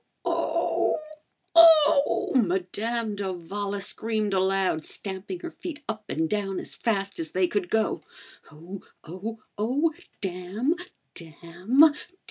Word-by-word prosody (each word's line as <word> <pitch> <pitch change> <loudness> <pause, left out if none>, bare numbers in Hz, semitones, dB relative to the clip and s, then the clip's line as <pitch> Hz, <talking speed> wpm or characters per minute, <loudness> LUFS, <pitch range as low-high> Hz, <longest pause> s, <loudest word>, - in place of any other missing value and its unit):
Oh! - - +1 0.6
Oh!" 315 -4 +6
Madame 215 +2 0
d'Avala 200 +1 -4
screamed 215 0 -1
aloud, 190 -4 +1
stamping 195 - -6
her 345 - -6
feet 315 -4 -8
up 215 -1 -5
and 160 +1 0
down 195 0 -2
as - - -6
fast 200 -5 -1
as 160 -1 -3
they 185 0 +3
could 185 -1 -2
go. 220 0 +1 0.5
"Oh! 170 +5 -9 0.2
Oh! 215 +7 -7 0.2
Oh! 280 +9 +1 0.3
Damn! 190 - -1 0.4
Damn! 175 - +2
200 Hz, 110 wpm, -26 LUFS, 185-230 Hz, 0.6 s, Oh